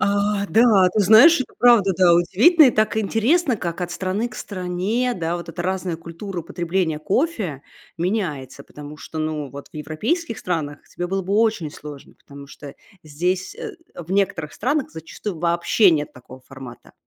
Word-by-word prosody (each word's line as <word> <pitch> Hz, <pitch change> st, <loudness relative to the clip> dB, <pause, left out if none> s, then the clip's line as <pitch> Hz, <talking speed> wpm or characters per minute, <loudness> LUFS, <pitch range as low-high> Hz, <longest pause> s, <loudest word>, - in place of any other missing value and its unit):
А, 200 Hz, 0 st, 0 dB
да, 215 Hz, -5 st, +5 dB
ты 215 Hz, -, +1 dB
знаешь, 225 Hz, -, +7 dB
это -, -, -5 dB
правда, 230 Hz, -6 st, +5 dB
да, 180 Hz, -2 st, +5 dB
удивительно. 235 Hz, -, +5 dB
И -, -, +5 dB
так 215 Hz, +1 st, 0 dB
интересно, 230 Hz, -, +1 dB
как 170 Hz, -1 st, -5 dB
от 175 Hz, 0 st, -3 dB
страны 195 Hz, +5 st, -2 dB
к -, -, -14 dB
стране, 195 Hz, +6 st, -2 dB
да, 170 Hz, -1 st, -2 dB
вот 170 Hz, -, -9 dB
эта 175 Hz, -, -5 dB
разная 185 Hz, -2 st, -2 dB
культура 170 Hz, +2 st, -7 dB
потребления 170 Hz, -2 st, -2 dB
кофе 195 Hz, -, -2 dB, 0.4 s
меняется, 155 Hz, -, -3 dB
потому 150 Hz, 0 st, -11 dB
что, 160 Hz, +2 st, -9 dB
ну, 155 Hz, -2 st, -3 dB
вот 140 Hz, 0 st, -10 dB
в -, -, -37 dB
европейских 225 Hz, -, -3 dB
странах 155 Hz, -5 st, -3 dB
тебе 175 Hz, -, -5 dB
было 195 Hz, +1 st, -2 dB
бы 195 Hz, +3 st, -2 dB
очень 215 Hz, -8 st, +1 dB
сложно, 145 Hz, -2 st, -11 dB
потому 140 Hz, 0 st, -14 dB
что 145 Hz, -1 st, -11 dB, 0.3 s
здесь, 180 Hz, -, -2 dB
э, 455 Hz, -2 st, -8 dB, 0.2 s
в 175 Hz, +1 st, -10 dB
некоторых 180 Hz, -6 st, -1 dB
странах 280 Hz, +5 st, -1 dB
зачастую 165 Hz, +3 st, -7 dB
вообще 170 Hz, +4 st, +3 dB
нет 150 Hz, -2 st, -2 dB
такого 130 Hz, +1 st, -14 dB
формата. 130 Hz, -2 st, -12 dB
180 Hz, 170 wpm, -21 LUFS, 155-215 Hz, 0.4 s, знаешь